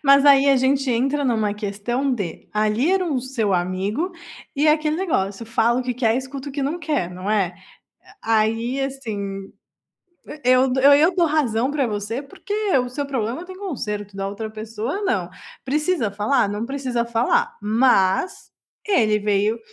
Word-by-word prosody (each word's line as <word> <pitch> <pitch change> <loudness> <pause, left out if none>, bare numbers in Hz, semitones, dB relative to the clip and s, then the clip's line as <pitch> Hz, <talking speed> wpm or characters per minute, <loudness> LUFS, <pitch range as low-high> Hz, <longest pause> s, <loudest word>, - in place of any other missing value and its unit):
Mas 275 0 +6
aí 280 -1 +6
a 275 - +5
gente 265 +1 +1
entra 270 +5 +1
em - - +2
uma 215 -3 0
questão 210 +6 -2
de, 185 -8 -6
ali 215 +8 +1
era 385 -1 +2
o 285 -7 -1
seu 235 -6 -1
amigo 190 - -1 0.4
e 295 +2 +2
aquele 305 0 +2
negócio 230 - -1
fala 230 +2 +2
o - - -2
que 250 0 -3
quer, 230 -1 +1
escuta 265 +1 -5
o - - -8
que 280 - -3
não 295 +6 -1
quer 295 - -1
não 185 +3 -5
é? 195 -5 +1 0.7
Aí 225 +4 +1
assim, 205 -8 -5 0.9
eu 255 +1 +4
eu 280 +1 +8
eu 315 +6 +5
dou 345 - +4
razão 265 -5 +1
para 285 -3 0
você 215 +4 -3
porque 290 +8 -9 0.3
o 250 -1 -1
seu 285 +3 -4
problema 255 +3 -3
tem 370 0 -10
conserto, 210 - -5
da 195 0 -2
outra 210 +2 -5
pessoa 220 - -5
não, 380 - 0 0.4
precisa 300 - 0
falar? 210 +2 +1
Não 210 +2 -3
precisa 255 -2 -2
falar, 465 - +1
mas 215 - +2 0.4
ele 220 - +3
veio 210 +2 +1
245 Hz, 165 wpm, -22 LUFS, 210-280 Hz, 0.9 s, eu